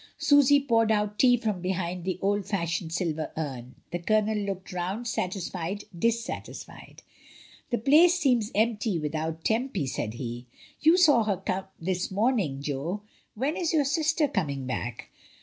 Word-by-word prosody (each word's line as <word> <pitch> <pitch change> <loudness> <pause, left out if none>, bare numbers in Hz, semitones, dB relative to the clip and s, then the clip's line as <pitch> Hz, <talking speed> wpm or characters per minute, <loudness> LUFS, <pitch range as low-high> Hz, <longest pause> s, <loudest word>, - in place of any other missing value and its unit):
Susy 285 -1 +5
poured 230 -5 +2
out 210 -1 0
tea 245 -2 +6
from 215 -6 -2
behind 180 -1 -2
the 185 -1 -1
old 205 +1 +1
fashioned 170 -4 -2
silver 160 -3 -2
urn. 130 -5 -5 0.2
The 175 - -2
Colonel 215 +4 +1
looked 195 -3 -4
round, 185 +6 -3
satisfied, 185 -1 -3
dis 230 +6 +1
satisfied. - - -8 0.7
"The 240 - +1
place 320 +9 +5
seems 245 -10 +2
empty 215 -2 +1
without 160 +1 -3
Tempy," 225 - 0
said 115 -4 -3
he. 120 0 -6 0.3
"You 325 +3 +5
saw 295 -10 +5
her 200 -4 -1 0.4
this 180 +1 -2
morning, 195 - 0
Jo; 150 +8 -3 0.3
when 270 +8 -1
is 350 -3 -1
your 300 -3 +3
sister 310 +1 +2
coming 140 - -2
back?" 120 -2 -5
200 Hz, 150 wpm, -27 LUFS, 165-240 Hz, 0.7 s, tea